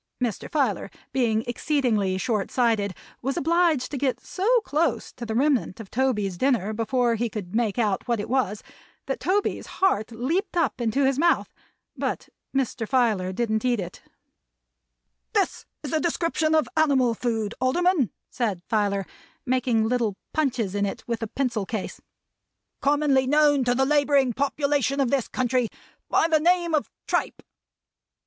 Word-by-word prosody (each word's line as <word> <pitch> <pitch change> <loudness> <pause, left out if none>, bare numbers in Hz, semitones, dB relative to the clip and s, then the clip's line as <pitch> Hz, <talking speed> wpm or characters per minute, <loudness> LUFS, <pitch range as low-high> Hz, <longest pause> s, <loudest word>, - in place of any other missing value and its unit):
Mr. 240 -6 -2
Filer 260 -11 0 0.2
being 225 -4 +1
exceedingly 240 -7 0
short 210 -1 -1
sighted, 220 -6 +1 0.3
was 270 +2 -2
obliged 330 -4 +2
to 280 - -3
go 270 -1 +2
so 445 +7 +1
close 300 - -1
to 235 - -7
the 220 - -2
remnant 265 -6 +1
of 215 -4 -10
Toby's 210 -8 0
dinner 235 -6 +1
before 235 +2 +1
he 230 +1 -1
could 200 -5 -6
make 225 -2 0
out 210 -3 0
what 235 -2 +1
it 205 - -3
was, 240 -5 0 0.4
that - - -3
Toby's 400 +2 0
heart 245 - +2
leaped 325 - -2
up 280 -7 +1
into 235 +4 +1
his 270 0 +1
mouth. 340 +2 +2 0.4
But - - -3 0.2
Mr. 250 -4 -1
Filer 220 -8 +2
didn't 220 +1 -1
eat 245 -3 +1
it. 175 -2 -6 1.3
"This - - 0 0.2
is 290 - -5
a 315 - +3
description 325 -1 +1
of 310 - +3
animal 275 -6 +3
food, 225 -2 -2
Alderman," 325 - +2 0.2
said 205 -8 -2
Filer, 200 -3 0 0.4
making 245 -3 +1
little 230 -4 0 0.2
punches 255 -10 0
in 205 0 0
it - - -6
with 235 -1 -2
a 225 - -2
pencil 235 -5 -2
case, 220 -4 -5 0.8
"commonly 280 -2 +2
known 295 -1 +4
to 245 0 +2
the 265 +1 +2
laboring 285 -3 +3
population 280 0 0
of 265 -3 +1
this 275 -4 +1
country 250 -1 0 0.4
by - - +3
the 315 -2 +3
name 345 +1 +2
of 305 - +1 0.2
tripe." - - -1
250 Hz, 155 wpm, -25 LUFS, 220-285 Hz, 1.3 s, known